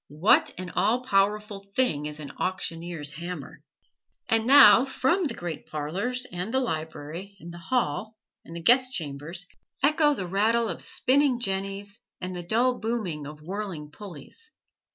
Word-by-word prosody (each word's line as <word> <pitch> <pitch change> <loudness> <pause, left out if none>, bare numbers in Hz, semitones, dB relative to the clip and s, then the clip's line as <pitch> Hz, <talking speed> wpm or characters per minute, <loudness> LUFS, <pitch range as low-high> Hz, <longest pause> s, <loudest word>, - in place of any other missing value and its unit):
What 155 +8 +4
an 180 -1 -6
all 245 +3 +1
powerful 210 -2 +1 0.2
thing 150 - +1
is 150 0 -8
an 145 -2 -7
auctioneer's 170 -4 -3
hammer! 165 -2 -7 0.7
And 225 0 +1
now 260 -3 +9
from 275 +7 +1
the 285 - -3
great 175 -2 -6
parlors, 195 +13 -2
and 180 +4 -4
the 260 - +2
library, 160 - -5
and 170 -1 -10
the 170 - -9
"hall," 215 - -1 0.3
and 165 - -11
the 170 - -6
guest 255 +4 +5
chambers 160 - -5 0.4
echo 295 0 +4
the 190 - -4
rattle 220 +5 +2
of - - -4
spinning 265 -1 +2
jennies 195 -1 -3 0.2
and 185 0 -5
the 175 - -4
dull 240 +8 +1
booming 205 -11 -3
of 150 0 -11
whirling 180 -5 -5
pulleys. 205 - -11
195 Hz, 155 wpm, -26 LUFS, 165-235 Hz, 0.7 s, now